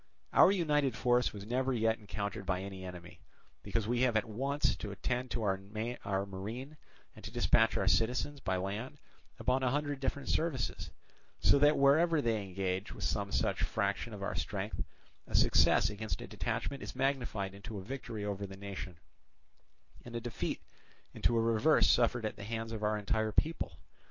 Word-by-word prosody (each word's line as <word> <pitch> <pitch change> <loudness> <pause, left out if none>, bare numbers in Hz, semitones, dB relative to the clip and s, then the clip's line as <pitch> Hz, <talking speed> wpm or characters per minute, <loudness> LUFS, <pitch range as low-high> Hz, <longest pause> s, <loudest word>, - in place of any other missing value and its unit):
Our - - +8
united 150 - +2
force 125 0 +2
was 100 -1 -8
never 130 +4 0
yet 115 -2 +1
encountered 100 +1 -4
by 95 -1 -1
any 95 -1 -7
enemy, 90 -2 -9 0.4
because 110 -2 -2
we 120 +1 +1
have 125 -3 +3
at 110 - +1
once 135 +5 0
to 105 - -5
attend 125 +5 -2
to 115 - -2
our 95 -2 0 0.6
marine 110 +10 -6 0.4
and - - -13
to - - -5
dispatch 115 0 +3
our - - 0
citizens 125 +5 +2
by 95 -7 -1
land 105 +9 -4 0.4
upon 130 +1 +1
a 130 - +2
hundred 145 +1 -1
different 135 +1 -2
services; 150 - -1 0.5
so 140 - +5
that, 145 +1 +5
wherever 155 +4 +5
they 115 -6 +1
engage 95 +1 -2
with - - -7
some 100 -2 -1
such - - 0
fraction - - -1
of - - -6
our - - -2
strength, - - -3 0.4
a - - -2
success 100 - +5
against 105 +1 -4
a - - -6
detachment 140 -1 -3
is - - -7
magnified 125 -7 -1
into 100 +2 -8
a 95 - -6
victory 110 -3 -5
over 100 -1 -3
the 95 0 -10
nation, 95 -3 -6 1.1
and 120 0 -9
a - - 0
defeat 120 0 -3 0.5
into 120 - +1
a - - +4
reverse 115 +7 +4
suffered 120 -1 +3
at 110 - -3
the - - -7
hands 115 +1 -4
of 110 -2 -4
our 105 0 +1
entire 110 +1 0
people. 150 - 0
115 Hz, 175 wpm, -33 LUFS, 100-130 Hz, 1.1 s, Our